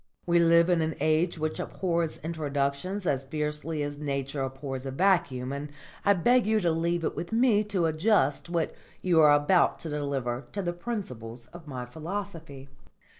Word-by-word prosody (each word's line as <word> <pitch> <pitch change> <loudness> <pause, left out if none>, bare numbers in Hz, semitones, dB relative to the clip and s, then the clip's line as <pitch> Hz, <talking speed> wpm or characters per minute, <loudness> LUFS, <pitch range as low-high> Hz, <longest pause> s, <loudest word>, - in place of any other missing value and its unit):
"We 170 0 +3
live 170 0 +5
in 175 -2 +3
an 160 0 -1
age 160 +3 +2
which 155 0 -2
abhors 170 -3 -1
introductions 155 +4 -2
as 135 -5 0
fiercely 150 +2 -3
as 145 0 -5
Nature 140 -1 -3
abhors 135 0 -4
a - - -2
vacuum, 135 -5 +1
and 145 +1 -5 0.3
I 200 - +5
beg 240 +6 +3
you 220 0 +3
to 170 -2 +2
leave 170 +1 0
it - - -1
with 170 - -5
me 225 -2 +4
to 195 -5 0
adjust 160 -2 +2
what 170 -2 -1 0.3
you 175 -3 +4
are 150 -1 +7
about 145 +5 +3
to 165 - -5
deliver 140 -4 -2
to 200 - -2
the 175 -1 -1
principles 125 - -6
of 170 -3 -11
my 125 -3 -5
philosophy." 160 -1 -6
160 Hz, 175 wpm, -28 LUFS, 140-175 Hz, 0.3 s, are